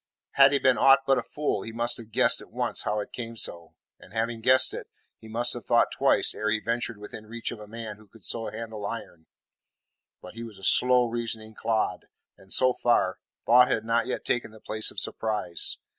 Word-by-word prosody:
Had 135 Hz, 0 st, +6 dB
he 140 Hz, -, +3 dB
been 130 Hz, -2 st, +2 dB
aught 135 Hz, 0 st, +5 dB
but 135 Hz, -1 st, +3 dB
a -, -, -2 dB
fool 145 Hz, -1 st, -3 dB
he 115 Hz, -, -7 dB
must 120 Hz, +1 st, 0 dB
have 115 Hz, -2 st, -11 dB
guessed -, -, +4 dB
at -, -, -14 dB
once -, -, -1 dB
how 105 Hz, -, -1 dB
it -, -, -9 dB
came 115 Hz, -1 st, -7 dB
so, 85 Hz, -5 st, -3 dB, 0.2 s
and 95 Hz, -, -17 dB
having 115 Hz, 0 st, -2 dB
guessed 130 Hz, +3 st, +4 dB
it, -, -, -7 dB, 0.3 s
he 110 Hz, -, -14 dB
must 120 Hz, +2 st, +2 dB
have 120 Hz, -3 st, -8 dB
thought 120 Hz, -1 st, +3 dB
twice -, -, +3 dB
ere 105 Hz, -, -2 dB
he 110 Hz, 0 st, +1 dB
ventured 115 Hz, 0 st, -3 dB
within 105 Hz, +1 st, -10 dB
reach 115 Hz, +1 st, -5 dB
of 120 Hz, -, -8 dB
a 105 Hz, -, -11 dB
man 110 Hz, -1 st, -8 dB
who 110 Hz, 0 st, -19 dB
could 105 Hz, -1 st, -17 dB
so 115 Hz, -1 st, -2 dB
handle 110 Hz, -1 st, -8 dB
iron. 85 Hz, -7 st, -8 dB, 0.9 s
But 90 Hz, -, -12 dB
he 115 Hz, -, -9 dB
was 115 Hz, -4 st, -9 dB
a 95 Hz, -, -15 dB
slow 125 Hz, +4 st, +5 dB
reasoning 115 Hz, -2 st, -3 dB
clod, 110 Hz, 0 st, -2 dB, 0.3 s
and 95 Hz, 0 st, -18 dB
so 130 Hz, -1 st, +5 dB
far, 120 Hz, -7 st, +1 dB, 0.3 s
thought 125 Hz, +2 st, +6 dB
had 110 Hz, -, -1 dB
not 115 Hz, 0 st, 0 dB
yet -, -, -4 dB
taken 120 Hz, -2 st, -1 dB
the 110 Hz, 0 st, -16 dB
place 110 Hz, +1 st, 0 dB
of -, -, -5 dB
surprise. 105 Hz, -6 st, -1 dB
115 Hz, 220 wpm, -26 LUFS, 110-120 Hz, 0.9 s, Had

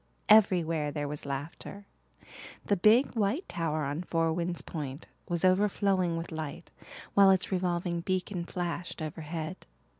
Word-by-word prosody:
Everywhere 175 Hz, -8 st, +4 dB
there 145 Hz, -1 st, -3 dB
was 145 Hz, 0 st, -6 dB
laughter. 145 Hz, +8 st, -6 dB, 0.8 s
The 205 Hz, -, +2 dB
big 220 Hz, +8 st, +4 dB
white 225 Hz, -, 0 dB
tower 155 Hz, -2 st, -2 dB
on 145 Hz, +4 st, -2 dB
Four 165 Hz, -2 st, 0 dB
Winds 175 Hz, 0 st, -2 dB
Point 145 Hz, -2 st, -6 dB, 0.2 s
was 175 Hz, +1 st, +1 dB
overflowing 185 Hz, -2 st, +2 dB
with 165 Hz, +1 st, -5 dB
light, 155 Hz, +1 st, -6 dB, 0.4 s
while 200 Hz, -1 st, +7 dB
its 190 Hz, 0 st, +3 dB
revolving 175 Hz, -2 st, -1 dB
beacon 185 Hz, 0 st, -2 dB
flashed 175 Hz, -1 st, -4 dB
overhead. 155 Hz, +2 st, -5 dB
175 Hz, 130 wpm, -30 LUFS, 160-190 Hz, 0.8 s, while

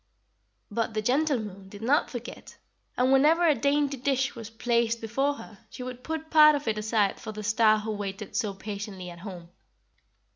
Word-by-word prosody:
"But 225 Hz, +1 st, -2 dB
the 215 Hz, -, +1 dB
gentle 280 Hz, +4 st, +2 dB
Moon 200 Hz, -3 st, -8 dB
did 205 Hz, +2 st, -10 dB
not 285 Hz, +7 st, +2 dB
forget, 240 Hz, -1 st, -8 dB, 0.4 s
and 255 Hz, +2 st, +3 dB
whenever 320 Hz, +6 st, +5 dB
a 310 Hz, -, +6 dB
dainty 280 Hz, +2 st, +1 dB
dish 265 Hz, +1 st, 0 dB
was 230 Hz, -2 st, -8 dB
placed 235 Hz, 0 st, 0 dB
before 270 Hz, +6 st, 0 dB
her 215 Hz, -7 st, -12 dB
she 250 Hz, -, -8 dB
would 250 Hz, 0 st, -7 dB
put 320 Hz, +1 st, -5 dB
part 305 Hz, -1 st, +8 dB
of 285 Hz, -3 st, -4 dB
it 215 Hz, -1 st, 0 dB
aside 210 Hz, -2 st, +1 dB
for -, -, -6 dB
the 215 Hz, 0 st, -7 dB
Star 215 Hz, +1 st, +4 dB
who 215 Hz, +1 st, -4 dB
waited 205 Hz, 0 st, -5 dB
so 210 Hz, -5 st, -1 dB
patiently 200 Hz, -3 st, -6 dB
at 170 Hz, -, -12 dB
home. 175 Hz, -3 st, -9 dB
230 Hz, 185 wpm, -27 LUFS, 210-270 Hz, 0.4 s, part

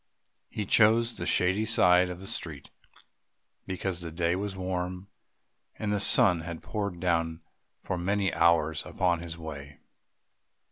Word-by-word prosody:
He 105 Hz, -, -4 dB
chose 115 Hz, +3 st, +3 dB
the -, -, -4 dB
shady 95 Hz, +4 st, +2 dB
side 90 Hz, -5 st, +4 dB
of 90 Hz, 0 st, -7 dB
the 95 Hz, -, -10 dB
street 80 Hz, -7 st, -4 dB, 1.0 s
because 95 Hz, -1 st, -3 dB
the 85 Hz, -, -6 dB
day 85 Hz, +1 st, 0 dB
was 100 Hz, +1 st, -4 dB
warm 90 Hz, 0 st, -4 dB, 0.7 s
and 105 Hz, -1 st, -2 dB
the 105 Hz, -, 0 dB
sun 90 Hz, -3 st, +5 dB
had 85 Hz, 0 st, -7 dB
poured 100 Hz, -5 st, -4 dB
down 85 Hz, -2 st, -1 dB, 0.4 s
for 95 Hz, -, -4 dB
many 100 Hz, +2 st, 0 dB
hours 80 Hz, -2 st, +2 dB
upon 90 Hz, -2 st, 0 dB
his 85 Hz, -1 st, -7 dB
way. 75 Hz, -3 st, -9 dB
90 Hz, 140 wpm, -28 LUFS, 85-100 Hz, 1.0 s, sun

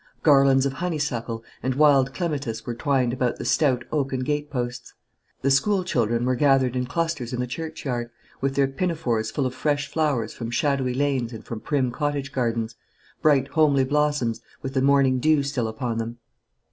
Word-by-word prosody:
Garlands 135 Hz, -2 st, +5 dB
of 135 Hz, -, -1 dB
honeysuckle 135 Hz, -9 st, -3 dB, 0.2 s
and 130 Hz, 0 st, -1 dB
wild 140 Hz, -2 st, +4 dB
clematis 140 Hz, -10 st, -3 dB
were 120 Hz, -, -3 dB
twined 130 Hz, -1 st, +1 dB
about 125 Hz, -2 st, 0 dB
the -, -, -6 dB
stout 130 Hz, 0 st, +2 dB
oaken 135 Hz, -3 st, -1 dB
gate 145 Hz, +2 st, -2 dB
posts. 125 Hz, -3 st, -4 dB, 0.5 s
The 135 Hz, -, +3 dB
school 190 Hz, +8 st, +3 dB
children 120 Hz, -5 st, 0 dB
were 130 Hz, -, +2 dB
gathered 130 Hz, -1 st, +3 dB
in 125 Hz, 0 st, -1 dB
clusters 150 Hz, -4 st, -2 dB
in 125 Hz, -, -2 dB
the 125 Hz, -, 0 dB
churchyard, 125 Hz, -4 st, -4 dB, 0.3 s
with 135 Hz, 0 st, 0 dB
their 140 Hz, 0 st, +3 dB
pinafores 135 Hz, -7 st, -1 dB
full 140 Hz, -, -1 dB
of 130 Hz, -, -2 dB
fresh 145 Hz, +2 st, 0 dB
flowers 140 Hz, -9 st, 0 dB
from 115 Hz, -1 st, -5 dB
shadowy 130 Hz, 0 st, 0 dB
lanes 130 Hz, -4 st, 0 dB
and 110 Hz, -, -9 dB
from 115 Hz, -, -5 dB
prim 130 Hz, 0 st, 0 dB
cottage 145 Hz, 0 st, -2 dB
gardens, 115 Hz, -3 st, -1 dB, 0.5 s
bright 140 Hz, -3 st, +3 dB
homely 145 Hz, -3 st, +3 dB
blossoms, 145 Hz, -4 st, 0 dB, 0.2 s
with 135 Hz, -1 st, -4 dB
the 130 Hz, -, +1 dB
morning 135 Hz, -1 st, +4 dB
dew 155 Hz, +1 st, +3 dB
still 135 Hz, -5 st, -1 dB
upon 115 Hz, +1 st, -3 dB
them. 115 Hz, +1 st, -4 dB
135 Hz, 175 wpm, -24 LUFS, 120-145 Hz, 0.5 s, Garlands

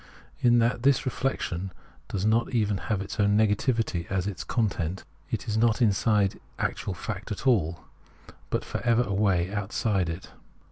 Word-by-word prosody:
In 120 Hz, -1 st, +5 dB
that 120 Hz, +1 st, +2 dB
this 135 Hz, 0 st, +4 dB
reflec 135 Hz, 0 st, -1 dB
tion 90 Hz, +2 st, -3 dB, 0.4 s
does 100 Hz, 0 st, -2 dB
not 115 Hz, +3 st, +2 dB
even 105 Hz, -3 st, +2 dB
have 105 Hz, -3 st, +1 dB
its 100 Hz, -, -7 dB
own 100 Hz, 0 st, +4 dB
negativity 110 Hz, -4 st, +1 dB
as 95 Hz, -2 st, 0 dB
its 100 Hz, -3 st, -4 dB
content, 95 Hz, -6 st, -1 dB, 0.3 s
it -, -, -3 dB
is 110 Hz, 0 st, 0 dB
not 115 Hz, 0 st, +3 dB
inside 105 Hz, -3 st, +2 dB, 0.2 s
actual 95 Hz, -, -2 dB
fact 105 Hz, +3 st, -5 dB
at 105 Hz, -, -5 dB
all, 90 Hz, -10 st, +2 dB, 0.7 s
but -, -, -1 dB
for -, -, -4 dB
ever 120 Hz, 0 st, +3 dB
away 100 Hz, -4 st, +1 dB
outside 100 Hz, -2 st, 0 dB
it. 85 Hz, +3 st, -6 dB
105 Hz, 160 wpm, -27 LUFS, 95-115 Hz, 0.7 s, In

